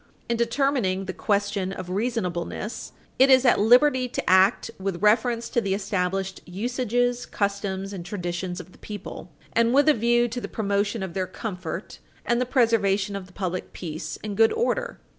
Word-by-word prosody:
In 235 - 0
determining 235 -5 0
the 190 - -4
question 200 -2 0
of 185 -2 -6
reasonableness, 210 -1 -3 0.3
it 265 +1 +7
is 260 0 +6
at 245 - +5
liberty 250 +4 +5
to - - -4
act 190 +5 +4
with 190 -1 -3
reference 230 +2 +3
to 235 - +1
the 195 -2 0
established 195 -1 -2
usages, 245 +4 -1
customs, 200 -1 -2
and 185 -3 -6
traditions 175 -1 -4
of 180 0 -10
the - - -20
people, 205 -4 -8 0.2
and 230 +2 +3
with 285 +2 +5
a 305 - +7
view 240 +1 +2
to 245 +2 -4
the - - -4
promotion 205 0 -1
of 185 -3 -5
their 185 0 -2
comfort 185 -3 -6 0.3
and 240 +1 +1
the 250 - 0
preservation 210 -6 +2
of 195 -2 -6
the 180 - -20
public 185 -2 -4
peace 160 -2 -6
and 210 -2 -4
good 225 0 +5
order. 485 +1 -1
205 Hz, 175 wpm, -25 LUFS, 190-240 Hz, 0.3 s, it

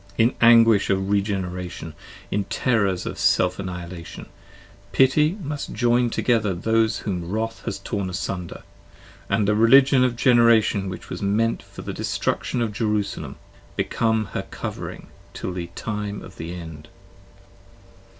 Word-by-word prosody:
In 115 +2 +4
anguish 115 -3 +6
of 95 0 0
regeneration: 90 -5 -2 0.4
in 100 -1 0
terrors 100 -8 0
of - - -5
self - - +2
annihilation: 90 -2 -7 0.7
Pity 150 - +3
must 145 -1 -5
join 120 +1 +2
together 110 -5 +1
those 110 +4 +1
whom 90 -4 -4
wrath 115 +3 -3
has - - -3
torn 100 -4 -3
in 90 - -6
sunder; 90 -1 -5 0.7
And 105 - +1
the 105 - +3
Religion 130 +4 +6
of 125 -2 +1
Generation 115 -5 +4
which 95 - -8
was - - -5
meant 110 +3 +1
for - - -11
the - - -5
destruction 120 - -1
Of 110 -2 -3
Jerusalem, 105 - -2 0.4
become 110 -1 0
her - - -4
covering, - - -6 0.3
till 90 - -4
the 90 -1 -4
time 105 -2 -4
of 95 - -12
the 80 +1 -6
End. 80 -4 -9
105 Hz, 140 wpm, -23 LUFS, 95-115 Hz, 0.7 s, anguish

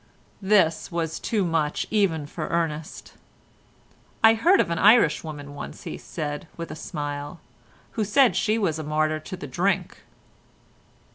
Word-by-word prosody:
This 190 -6 +2
was 165 -2 -2
too 210 -5 0
much 160 -3 0
even 185 -8 +1
for 155 +2 -5
Ernest. 160 -2 -3 1.1
"I 225 0 +8
heard 345 - +4
of - - +1
an 170 - -1
Irish 205 -7 +5
woman 145 -3 -8
once," 145 - -8
he - - -5
said, 150 +1 -5
with 165 -1 -6
a - - -6
smile, 145 0 -5 0.5
"who 220 - -1
said 245 +5 +4
she 215 0 +1
was 165 -8 0
a - - -4
martyr 155 +1 0
to 185 +4 -8
the 150 - -7
drink." 175 +9 -1
165 Hz, 150 wpm, -25 LUFS, 150-200 Hz, 1.1 s, I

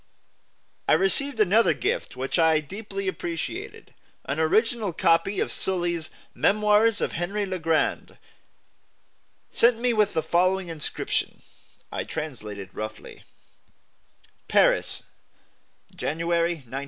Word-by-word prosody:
I - - +5
received 210 - +3
another 215 +3 +4
gift 470 +6 -2
which 135 +6 -1
I 160 -1 +4
deeply 195 +5 -6
appreciated, 170 -3 -5 0.3
an 140 +3 -3
original 215 +4 +1
copy 170 +3 +2
of - - 0
Sully's 175 -3 -1 0.2
"Memoires" 210 +1 +3
of - - 0
"Henry 195 +5 -2
le 185 -1 -4
Grand," 160 -1 0 1.3
sent 235 0 +4
me 245 0 +1
with 210 -4 +2
the 160 - +1
following 180 +3 +1
inscription 160 -3 -3 0.5
(I - - -3
translate 125 -10 -6
it 100 -1 -9
roughly): 110 0 -8 1.2
PARIS, - - +2 0.9
January, 170 +2 0
1906. 130 +3 -6
175 Hz, 110 wpm, -25 LUFS, 160-210 Hz, 1.3 s, I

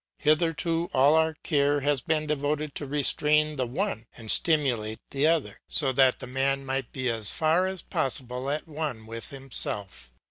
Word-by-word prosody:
Hitherto 165 +2 +1
all 140 +3 +5
our 160 0 +2
care 145 -2 +1
has 145 -1 +1
been 155 +2 -1
devoted 150 0 -2
to 145 - -5
restrain 150 +2 +2
the 130 -3 -2
one 135 - -3
and 115 -2 -1
stimulate 125 -9 +2
the 140 +2 +2
other, 165 -3 0
so 140 -4 +3
that 130 -1 +4
the - - -7
man 135 +2 -1
might 135 -1 -2
be 130 -1 -3
as 115 -4 +3
far 165 +4 +2
as 190 -2 -5
possible 125 0 -2
at 150 +3 -3
one 150 -8 -5
with 115 +1 -6
himself. 105 - -3
140 Hz, 170 wpm, -26 LUFS, 130-155 Hz, -, all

